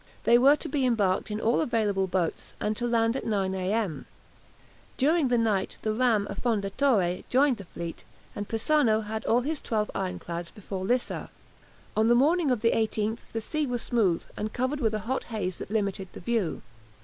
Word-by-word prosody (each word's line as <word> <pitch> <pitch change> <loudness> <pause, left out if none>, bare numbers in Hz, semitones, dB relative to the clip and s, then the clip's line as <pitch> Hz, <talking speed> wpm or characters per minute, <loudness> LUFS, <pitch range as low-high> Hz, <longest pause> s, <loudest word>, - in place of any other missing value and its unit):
They 240 +1 +6
were 275 +4 +7
to - - -7
be 275 -1 0
embarked 210 -8 +1
in 210 0 -3
all 230 +2 +2
available 210 -8 +1
boats, 180 -3 -2
and 215 +1 -1
to 240 +2 -2
land 230 0 +2
at - - -3
9 195 -3 0
a.m. 190 -1 -1 0.9
During 300 +2 +3
the 245 -1 +2
night 215 -4 0
the 215 - 0
ram 225 -3 +2
"Affondatore" 200 -2 0
joined 265 -1 +3
the 200 - -9
fleet, 170 -1 -7 0.3
and 205 0 -4
Persano 225 0 +2
had 220 +1 -4
all 240 +2 +3
his 300 +3 -2
twelve 215 -2 -1
ironclads 175 -2 -4
before 195 -3 -6
Lissa. 245 +4 -1 0.7
On 220 +1 +3
the 240 - +5
morning 310 +5 +3
of 245 -4 +1
the 230 - +3
18th 220 0 0
the 225 - -3
sea 305 +6 -1
was 245 -2 -2
smooth, 200 -8 +1
and 215 +1 -4
covered 260 +4 -1
with 220 -5 +1
a - - -1
hot 260 +3 -1
haze 190 -6 -3
that - - -7
limited 200 -3 -1
the - - -8
view. 210 -4 -1
220 Hz, 185 wpm, -27 LUFS, 200-245 Hz, 0.9 s, were